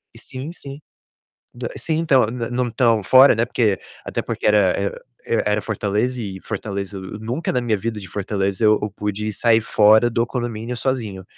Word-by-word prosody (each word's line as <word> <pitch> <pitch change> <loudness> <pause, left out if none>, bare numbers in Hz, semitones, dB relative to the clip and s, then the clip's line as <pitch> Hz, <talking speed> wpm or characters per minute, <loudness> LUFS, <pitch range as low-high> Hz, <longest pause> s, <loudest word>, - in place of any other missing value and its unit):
E - - -12
sim, 130 +5 -7
sim. 140 -5 -10 0.7
Da 120 0 -5
sim, 160 - -2
então, 135 -9 +3
n 115 0 -4
não 125 0 0
estão 115 -1 +2
fora, 130 +7 +7
né, 115 +1 +1
porque 105 -5 +1 0.3
até - - -2
porque - - -5
era, 105 -3 +4
eh 100 0 -1 0.3
eh, 115 - 0
era 105 +1 +1
Fortaleza 110 +4 -1
e 95 -3 -6
Fortaleza 100 -1 -5
o 95 +2 -8
Nunca 120 +9 -3
na 125 - +1
minha 115 -3 0
vida 110 +1 -4
de 95 - -9
Fortaleza 100 +1 -2
eu 105 - +6
eu 105 - -1
pude 105 +1 -3
sair 115 +2 +3
fora 110 +2 +4
do 115 0 0
condomínio 120 -1 -4
sozinho. 115 -7 -3
110 Hz, 190 wpm, -21 LUFS, 105-125 Hz, 0.7 s, fora